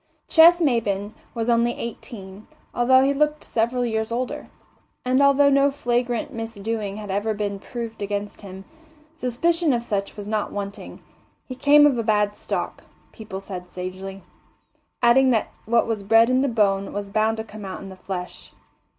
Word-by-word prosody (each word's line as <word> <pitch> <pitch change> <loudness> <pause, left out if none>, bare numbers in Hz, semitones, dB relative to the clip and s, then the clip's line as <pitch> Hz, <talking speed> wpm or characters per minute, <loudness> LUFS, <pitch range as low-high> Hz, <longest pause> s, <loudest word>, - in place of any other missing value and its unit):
Ches 340 +2 +7
Maybin 215 - 0 0.2
was 230 -1 -2
only 235 0 +3
eighteen, 210 -4 -8 0.3
although 260 +2 +4
he 275 +1 +2
looked 300 +1 0
several 240 +2 0
years 220 -1 -2
older, 250 +2 -3 0.6
and 255 +2 +3
although 280 0 +5
no 275 +1 +4
flagrant 245 -3 -1
misdoing 225 -2 -4
had 210 -2 -6
ever 210 +2 -1
been 205 -1 -3
proved 230 0 -7
against 205 0 -4
him, 190 -1 -10 0.5
suspicion 325 +4 +1
of 235 -1 -1
such 200 -3 -3
was 205 -1 -7
not 215 -1 -1
wanting. 200 -1 -7 0.4
He 255 - -7
came 290 +3 +6
of 270 -5 +3
a - - 0
bad 210 -1 +1
stock, - - -4 0.3
people 215 -3 -8
said 180 -2 -8
sagely, 185 +1 -7 0.8
adding 260 +3 +5
that 230 -4 +1 0.2
what 235 +1 +3
was 225 -3 -2
bred 225 +4 +4
in 255 +1 +3
the 280 - +2
bone 200 -5 +1
was 200 -1 -5
bound 220 +2 +1
to 220 - -3
come 215 -1 -11
out 190 -1 -6
in 195 - -9
the 190 - -10
flesh. 185 -1 -7
225 Hz, 165 wpm, -23 LUFS, 200-250 Hz, 0.8 s, Ches